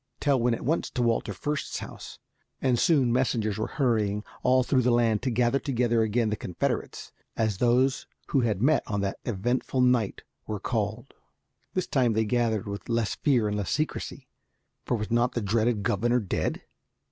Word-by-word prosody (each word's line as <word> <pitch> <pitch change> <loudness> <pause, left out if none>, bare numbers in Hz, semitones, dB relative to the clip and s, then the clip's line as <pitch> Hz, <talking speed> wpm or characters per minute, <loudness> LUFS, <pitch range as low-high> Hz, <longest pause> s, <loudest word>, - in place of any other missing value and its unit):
Tell 140 -3 +2
went 120 0 +2
at - - -8
once 160 +5 0
to 125 - -1
Walter 115 -2 +1
Fürst's 145 +9 -3
house, - - -9 0.4
and 125 -3 +1
soon 135 -7 +3
messengers 110 -5 0
were 110 - -1
hurrying 105 -7 +1 0.2
all 130 0 +4
through 130 0 +2
the 125 - +2
land 115 -3 +2
to 130 - -1
gather 120 +2 +2
together 120 -5 +1
again 110 0 +1
the - - +1
Confederates, 90 -4 -3 0.3
as 110 -4 0
those 125 +2 +2 0.2
who 140 - +2
had 110 -3 0
met 150 +2 +4
on 105 -1 -1
that 100 -1 -3
eventful 120 +4 -1
night 125 -5 +2 0.2
were 105 -2 -3
called. 110 +3 -3 0.6
This 185 - 0
time 125 -4 +2
they 110 +1 +1
gathered 115 -2 0
with 100 +3 -6
less 115 -2 0
fear 125 -7 +2
and 105 - -1
less 100 -3 -2
secrecy, 155 +2 -3 0.6
for 120 - 0
was 105 +1 -5
not 120 +2 +2
the - - -1
dreaded 110 +1 +1
governor 120 +5 +1
dead? 100 -6 -2
120 Hz, 180 wpm, -27 LUFS, 110-125 Hz, 0.6 s, all